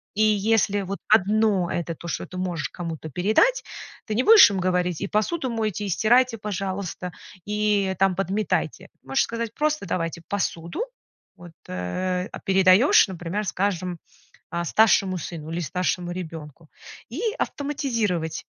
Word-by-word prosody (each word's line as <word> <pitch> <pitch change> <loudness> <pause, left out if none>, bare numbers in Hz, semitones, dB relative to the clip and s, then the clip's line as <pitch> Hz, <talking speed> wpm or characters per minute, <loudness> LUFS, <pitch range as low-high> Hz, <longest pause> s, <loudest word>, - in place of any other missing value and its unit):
И 215 - 0
если 210 -1 +2
вот 195 +1 -5
одно 210 -3 +3
это 170 -1 -3
то, 170 - -10
что 170 - -4
ты 185 - -9
можешь 175 -4 -2
кому-то 165 -3 -6
передать, 215 - +2 0.4
ты 220 - -3
не 240 - +3
будешь 435 - +9
им 195 - -2
говорить: 180 -2 0
"И 200 - -2
посуду 255 - -1
мойте, 215 -3 -2
и - - -3
стирайте, 235 +5 +3
пожалуйста, 195 -3 -4 0.3
и 210 -2 +1
там 195 -1 +3
подметайте". 195 +3 -2
Можешь 270 - +1
сказать 230 -1 -4
просто: 305 -9 0
"Давайте 165 -1 -2
посуду". 200 - -2 0.5
Вот, 175 -1 -13 0.2
э, 180 - -2
а - - -7
передаёшь, 190 +6 +5
например, 185 +3 -4
скажем, 180 -2 -1 0.5
а 170 0 -2
старшему 195 -1 +3
сыну 160 -1 -7
или 170 +2 -3
старшему 175 +1 -2
ребенку 160 -3 -8 0.4
и 270 - -5 0.2
автоматизировать 230 - -2
190 Hz, 140 wpm, -24 LUFS, 175-215 Hz, 0.5 s, будешь